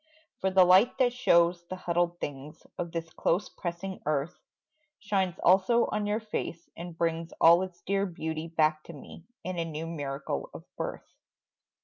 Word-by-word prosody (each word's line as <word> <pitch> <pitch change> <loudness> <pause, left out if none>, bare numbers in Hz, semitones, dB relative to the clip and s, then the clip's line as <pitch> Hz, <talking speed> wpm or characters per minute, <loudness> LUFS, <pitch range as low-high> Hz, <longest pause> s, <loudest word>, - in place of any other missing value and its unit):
For 190 - +1
the 190 0 +6
light 190 +7 +5
that 250 -2 +3
shows 170 -8 +3
the 185 - -5
huddled 175 -1 -1
things 145 +1 -7
Of 170 -1 -3
this 165 -1 -4
close 175 +5 0
pressing 180 +2 -5
earth, 150 +3 0 0.6
Shines 190 -4 -1
also 195 +6 +5
on 210 -1 -1
your 210 +1 0
face 210 -6 -5
and 170 -1 -8
brings 165 0 -1
All 170 +2 +7
its 185 -2 -7
dear 200 +1 0
beauty 160 -2 -4
back 155 -1 +1
to 170 - -9
me 155 +3 -12 0.2
In 180 -1 -4
a - - +1
new 160 -1 -5
miracle 145 -4 -4
of - - -9
birth. - - -5
170 Hz, 165 wpm, -29 LUFS, 165-190 Hz, 0.6 s, All